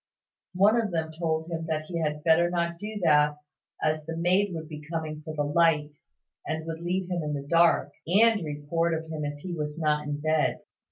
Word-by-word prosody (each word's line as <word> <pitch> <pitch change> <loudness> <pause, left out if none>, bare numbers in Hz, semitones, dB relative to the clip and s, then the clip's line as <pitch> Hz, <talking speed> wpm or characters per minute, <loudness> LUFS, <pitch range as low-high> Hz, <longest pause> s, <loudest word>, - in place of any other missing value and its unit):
One 210 +5 +5
of 215 - -2
them 160 -3 -2
told 160 0 -2
him 165 -1 -3
that 155 -1 -1
he 170 +1 -4
had 150 -2 -2
better 170 +1 +4
not 170 -1 -1
do 210 +1 -5
that, 150 -2 +4 0.5
as 155 0 +1
the 165 0 -4
maid 185 +4 +2
would 160 -2 -5
be 150 -1 -8
coming 155 -1 -5
for 155 0 -7
the 145 - 0
light, 150 0 +2 0.5
and 160 0 -3
would 165 0 -5
leave 180 +1 -1
him 175 -1 0
in 150 -1 -2
the 140 0 -6
dark, 170 +2 +4 0.2
and 210 +2 +4
report 160 +3 -1
of 160 0 -6
him 155 -1 -4
if 145 0 -3
he 180 +1 -5
was 150 -1 -4
not 150 -2 0
in 145 0 -3
bed. 155 0 +1
160 Hz, 210 wpm, -27 LUFS, 150-170 Hz, 0.5 s, One